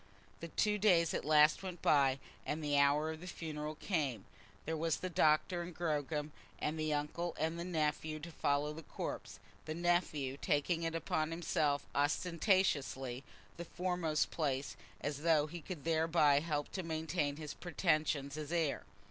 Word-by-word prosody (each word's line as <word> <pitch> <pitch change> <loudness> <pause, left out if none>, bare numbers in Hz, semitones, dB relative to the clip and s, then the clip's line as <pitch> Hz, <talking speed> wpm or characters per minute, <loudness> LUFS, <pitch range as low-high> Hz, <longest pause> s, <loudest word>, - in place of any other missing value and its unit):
The 170 - -6
two 210 +5 +1
days 175 -6 +4
at - - -1
last 150 0 +5
went 180 -3 -7
by, 135 -3 +4 0.3
and 155 +1 -3
the 145 -1 +1
hour 145 +2 +4
of 160 0 -8
the 180 - -8
funeral 155 -3 -5
came. 145 - -1 0.4
There 160 - -1
was 160 0 0
the 185 - -4
doctor 160 +3 +3
and 170 -1 -7
Gogram, 150 -2 -1 0.3
and 155 +1 -2
the 155 0 0
uncle 150 +4 -2
and 160 +2 -1
the - - -2
nephew, 155 -2 -1
to 170 +2 -7
follow 145 0 0
the 160 - -8
corpse, - - -6 0.3
the 155 - -4
nephew 170 -6 0
taking 165 +3 +1
upon 160 -1 -1
himself 155 -3 0
ostentatiously 145 - +1 0.3
the 170 - -5
foremost 175 -4 0
place, 140 -4 -1 0.3
as 145 0 -3
though 155 -2 +4
he 170 +2 -7
could 160 -3 -7
thereby 160 -3 +4
help 150 -2 -2
to 190 - -3
maintain 160 -3 -1
his 155 -2 -6
pretensions 155 -4 0
as 155 0 -5
heir. 165 -5 0
155 Hz, 160 wpm, -35 LUFS, 145-170 Hz, 0.4 s, last